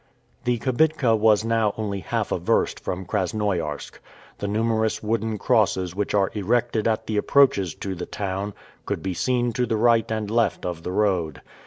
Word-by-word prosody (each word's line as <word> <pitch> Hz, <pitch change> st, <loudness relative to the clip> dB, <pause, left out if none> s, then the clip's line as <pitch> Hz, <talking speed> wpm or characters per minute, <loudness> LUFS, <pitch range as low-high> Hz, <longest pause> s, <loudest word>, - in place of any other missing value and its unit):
The 125 Hz, 0 st, +2 dB
kibitka 130 Hz, 0 st, +2 dB
was 110 Hz, 0 st, +3 dB
now 115 Hz, -2 st, +1 dB
only 100 Hz, -2 st, -2 dB
half 85 Hz, -, -2 dB
a -, -, 0 dB
verst -, -, +1 dB
from 95 Hz, +1 st, -4 dB
Krasnoiarsk. 90 Hz, -5 st, -2 dB, 0.4 s
The 100 Hz, -, -3 dB
numerous 110 Hz, +1 st, 0 dB
wooden 110 Hz, 0 st, -1 dB
crosses 95 Hz, -6 st, +1 dB
which 105 Hz, +1 st, -1 dB
are 100 Hz, -2 st, +2 dB
erected 115 Hz, +2 st, 0 dB
at 110 Hz, -1 st, 0 dB
the 110 Hz, -, -2 dB
approaches 105 Hz, -, +3 dB
to 95 Hz, -, -4 dB
the 90 Hz, -, -6 dB
town, 100 Hz, +1 st, -4 dB, 0.3 s
could -, -, -3 dB
be 95 Hz, -1 st, -2 dB
seen 120 Hz, +4 st, 0 dB
to 125 Hz, +2 st, 0 dB
the 110 Hz, -, 0 dB
right 115 Hz, 0 st, +3 dB
and 110 Hz, -1 st, -2 dB
left 115 Hz, -4 st, +1 dB
of 85 Hz, -2 st, -4 dB
the 90 Hz, -, -4 dB
road. 90 Hz, -6 st, 0 dB
105 Hz, 175 wpm, -24 LUFS, 95-115 Hz, 0.4 s, was